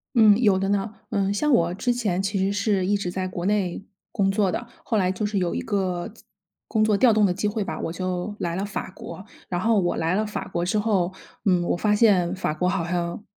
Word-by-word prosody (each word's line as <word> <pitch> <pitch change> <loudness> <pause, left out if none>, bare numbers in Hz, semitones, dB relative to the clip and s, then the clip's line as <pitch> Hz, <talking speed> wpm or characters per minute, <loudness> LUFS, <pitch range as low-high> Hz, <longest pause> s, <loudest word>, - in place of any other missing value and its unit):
嗯， 215 -3 +7
有 205 -5 +4
的 195 0 -1
呢。 200 +1 0 0.2
嗯， 200 -1 +1
像 300 +9 +1
我 170 -4 +3
之 245 +6 0
前 205 -7 -1
其 195 0 -1
实 195 +1 +1
是 200 -2 +1
一 205 +1 +2
直 180 -3 -3
在 185 0 -2
国 180 -1 -5
内 195 -1 0 0.3
工 195 -1 +1
作 195 -2 +1
的。 235 - -4 0.2
后 225 - 0
来 185 -2 +2
就 190 +3 -4
是 205 0 -1
有 180 -2 0
一 - - -2
个 190 -1 -2 0.6
工 215 -2 +1
作 215 -2 +3
调 240 0 +5
动 215 -1 +4
的 185 - +2
机 205 +3 -1
会 205 0 -1
吧， 160 -5 -5
我 165 - -3
就 185 +3 -3
来 170 -1 -2
了 195 +2 -2
法 205 - -5
国。 190 - -9 0.3
然 175 -1 -1
后 220 0 +3
我 175 -2 0
来 165 +3 0
了 215 +2 +1
法 210 - -4
国 170 0 -2
之 210 +4 +1
后， 195 -4 +1 0.3
嗯， 180 -3 +3
我 175 - 0
发 210 +3 +2
现 195 -6 +4
法 185 -4 -1
国 180 +3 0
好 180 -1 0
像 170 +1 -2
195 Hz, 260 characters per minute, -24 LUFS, 180-210 Hz, 0.6 s, 嗯